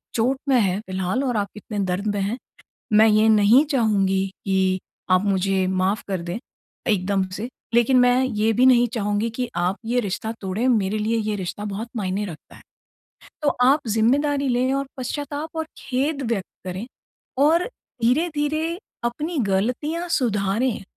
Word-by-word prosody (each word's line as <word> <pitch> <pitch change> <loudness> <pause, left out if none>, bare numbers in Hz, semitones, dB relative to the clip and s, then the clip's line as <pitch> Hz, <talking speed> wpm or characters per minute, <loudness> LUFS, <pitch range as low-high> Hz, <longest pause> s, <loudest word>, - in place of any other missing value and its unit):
चोट 250 +4 +2
में 255 - +5
है 195 -3 +1
फिलहाल 190 +7 -1
और 245 -4 0
आप 200 - 0
कितने 210 0 -6
दर्द 185 +3 -2
में 200 - 0
हैं। 205 +6 -1 0.6
मैं 215 +1 +7
ये 215 0 +4
नहीं 220 +5 +6
चाहूँगी 195 -7 +2 0.2
कि 190 -1 +1 0.3
आप 185 +2 +4
मुझे 195 -1 +1
माफ 190 +3 0
कर 190 -3 -2
दें 175 +4 -4 0.5
एकदम 195 -2 +1
से। 225 - -4 0.3
लेकिन 240 +2 +4
मैं 250 +1 +4
ये 225 -3 +1
भी 250 +4 +4
नहीं 245 -2 +6
चाहूँगी 210 0 0
कि 240 +1 -3
आप 180 +3 0
ये 245 +2 +1
रिश्ता 215 +1 -3
तोड़ें 195 +6 -1
मेरे 215 -3 +1
लिए 220 +2 0
ये 215 -1 -1
रिश्ता 195 +2 -5
बहुत 210 +3 -4
मायने 200 0 -1
रखता 165 -6 -10
है। - - -15 0.8
तो 295 - +3
आप 270 +4 +5
ज़िम्मेदारी 275 +6 +2
लें 255 +2 +1
और 275 0 -1
पश्चाताप 290 +4 -4
और 320 - -1
खेद 275 +2 -1
व्यक्त 195 -5 -1 0.2
करें 185 +5 -4 0.6
और 330 +4 +4 0.4
धीरे-धीरे 310 +5 +1 0.3
अपनी 300 +8 -2
गलतियाँ 250 - -1
सुधारें। 225 -3 0
220 Hz, 160 wpm, -23 LUFS, 195-260 Hz, 0.8 s, मैं